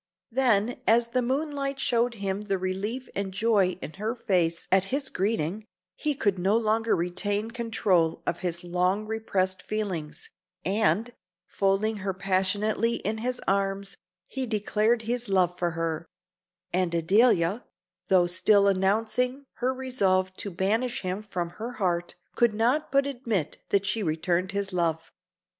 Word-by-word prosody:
Then, 240 -2 +2
as 235 +1 +4
the 255 +1 +1
moonlight 275 +2 -1
showed 240 -1 +1
him 195 -1 -2
the 200 -2 -1
relief 200 +7 -3
and 195 -1 -3
joy 195 -2 +2
in 155 - -6
her 220 +3 -1
face 175 -8 0
at 190 0 +4
his 270 +5 -2
greeting, 200 0 -1 0.3
he 300 -2 -1
could 200 -7 0
no 195 +5 +3
longer 225 0 +2
retain 205 +5 -1
control 210 -8 +1
of - - -1
his 175 -1 -3
long 180 +4 0
repressed 200 -4 -1
feelings, 180 -9 -4 0.3
and, 205 +4 +1 0.3
folding 200 +4 +1
her 195 -1 -3
passionately 200 +4 +1
in 220 +2 -3
his 245 +2 -2
arms, 195 0 0 0.3
he 265 -1 -3
declared 220 +1 +1
his 240 0 -2
love 180 -2 +3
for 175 - +1
her; 165 0 -2 0.7
and 180 -1 +1
Adelia, 195 +3 +3 0.4
though 185 -2 +5
still 200 +3 +4
announcing 225 +8 +1
her 255 +1 +1
resolve 195 -8 +1
to 205 - -3
banish 215 +7 0
him 185 +2 -3
from 180 -5 -4
her 240 +2 -4
heart, 175 -6 -1 0.2
could 235 -3 +2
not 245 +8 +1
but 275 0 +3
admit 230 - -2
that 200 0 +2
she 220 +3 0
returned 175 +2 0
his 200 -1 -2
love. 165 -2 -1
200 Hz, 145 wpm, -27 LUFS, 185-230 Hz, 0.7 s, though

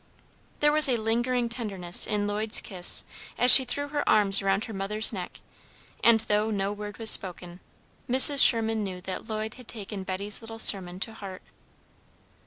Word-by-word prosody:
There 295 0 +2
was 305 -2 +6
a 245 - -1
lingering 240 +2 -3
tenderness 200 -7 +1
in 210 -1 -4
Lloyd's 210 +2 -1
kiss 185 -5 +2 0.3
as 250 0 +6
she 265 - +9
threw 285 +3 -5
her 290 0 -4
arms 200 -2 +4
around 195 +2 -3
her 225 - -11
mother's 210 +3 -1
neck, 185 -3 -10 0.6
and, 230 -1 +3
though 210 0 -3
no 200 -1 -4
word 205 0 -11
was 225 -1 -2
spoken, 180 -1 -3 0.5
Mrs. 265 +3 +5
Sherman 225 -2 +1
knew 185 -2 -8
that 190 0 -9
Lloyd 215 0 -6
had 250 -3 -17
taken 205 -3 -9
Betty's 195 +2 -3
little 225 0 -12
sermon 185 -5 0
to 220 - -4
heart. 195 -4 -12
215 Hz, 170 wpm, -24 LUFS, 195-230 Hz, 0.6 s, she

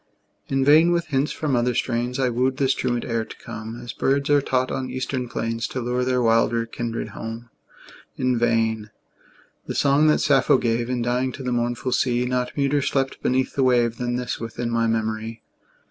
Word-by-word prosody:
In 135 -1 +1
vain 160 +4 +6
with 170 -2 0
hints 140 +1 +1
from 150 -4 -1
other 120 0 +1
strains 120 +1 -1
I 130 -1 +2
wooed 130 +2 0
this 135 -1 +2
truant 120 -2 -1
air 115 -2 -1
to - - -11
come 110 +2 -8
As 120 -4 -7
birds 140 +5 0
are 145 -1 +5
taught 130 -1 0
on 130 -1 -3
eastern 130 -1 -3
plains 115 0 -2
To 130 - -4
lure 125 +1 -1
their 125 -1 +1
wilder 115 0 +2
kindred 115 0 -4
home. 115 +1 -7 0.7
In 125 -1 +1
vain: 115 -2 +1 0.8
the - - -4
song 145 +2 +4
that 150 - +5
Sappho 135 -2 +4
gave, 120 -1 -1
In 125 -2 -1
dying, 125 +2 0
to 135 - -7
the 125 - -2
mournful 120 +1 -1
sea, 125 -1 +1
Not 125 0 -1
muter 140 0 +1
slept 135 0 -1
beneath 130 +1 0
the 140 - 0
wave 120 -2 +2
Than 120 0 -2
this 125 -1 -3
within 115 +1 -4
my 115 0 +1
memory. 110 0 -2
125 Hz, 190 wpm, -23 LUFS, 115-130 Hz, 0.8 s, vain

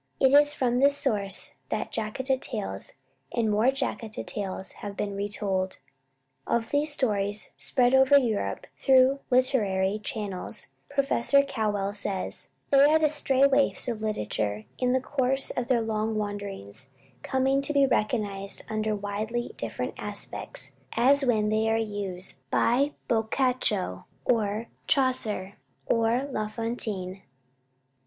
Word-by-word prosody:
It 265 0 +4
is 290 +1 +6
from 245 -2 +1
this 280 +1 +4
source 200 -8 -1
that - - -2
"Jataka 260 +5 -1
Tales" 95 0 -3 0.4
and 225 -2 +1
"More 215 +4 +3
Jataka 260 -5 -2
Tales" 195 -2 -4
have 200 -1 -6
been 200 -1 -2
retold. 195 -2 -2 0.7
Of 230 -1 0
these 290 +1 +2
stories, 205 -6 -1
spread 250 -1 +2
over 265 +1 +7
Europe 215 - 0
through 265 +1 +5
literary 215 -7 +2
channels, 210 -3 -4 0.2
Professor 280 -1 +3
Cowell 210 -7 -1
says, 200 -2 -3 0.2
"They 275 0 +7
are 305 +2 +5
the 310 -1 +3
stray 275 -2 +3
waifs 280 -1 +2
of 230 -3 -3
literature, 105 - -2
in 250 0 +2
the 260 - +2
course 270 0 0
of 245 -1 -2
their 245 -3 +3
long 220 0 -1
wanderings 200 - -5 0.3
coming 265 - +1
to 280 - 0
be 280 -1 +4
recognized 205 -5 -1
under 215 0 -1
widely 215 +4 -3
different - - -4
aspects, - - -6 0.2
as 275 +4 +4
when 220 -5 +2
they 220 +1 +2
are 225 - +2
used 200 -6 -4
by 275 - +2
Boccaccio, 220 - 0 0.2
or 220 -1 +1 0.2
Chaucer, 240 - 0 0.3
or 230 +4 +2
La 215 -4 -1
Fontaine." 215 -4 -4
225 Hz, 130 wpm, -27 LUFS, 205-265 Hz, 0.7 s, over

